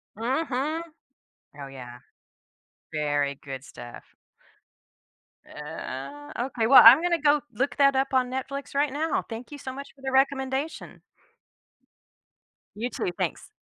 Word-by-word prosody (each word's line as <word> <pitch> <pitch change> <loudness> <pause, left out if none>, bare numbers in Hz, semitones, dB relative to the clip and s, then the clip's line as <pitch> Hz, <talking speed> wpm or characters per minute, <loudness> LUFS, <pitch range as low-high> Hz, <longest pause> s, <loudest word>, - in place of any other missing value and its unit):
Mhm. 275 +6 -1 0.8
Oh 140 - -6
yeah. 125 -2 -10 0.9
Very 145 -2 0
good 135 -1 -7
stuff. 120 -1 -11 1.4
Uh 145 -1 -8
Okay, 240 -2 -1
well, 270 - +10
I'm 245 +8 +10
gonna 345 -1 +1
go 295 -1 +4
look 270 +7 -1
that 275 -1 +5
up 270 0 0
on 255 -1 +2
Netflix 275 +2 -5
right 285 -1 +2
now, 310 +2 -1
thank 230 +4 -8
you 290 - -7
so 260 -1 -6
much 280 +1 -8
for 270 - -21
the 265 - -3
recommendation. 265 +2 -1 1.8
You 230 +4 -3
too, 200 - -3
thanks. - - -3
260 Hz, 130 wpm, -26 LUFS, -, 1.8 s, well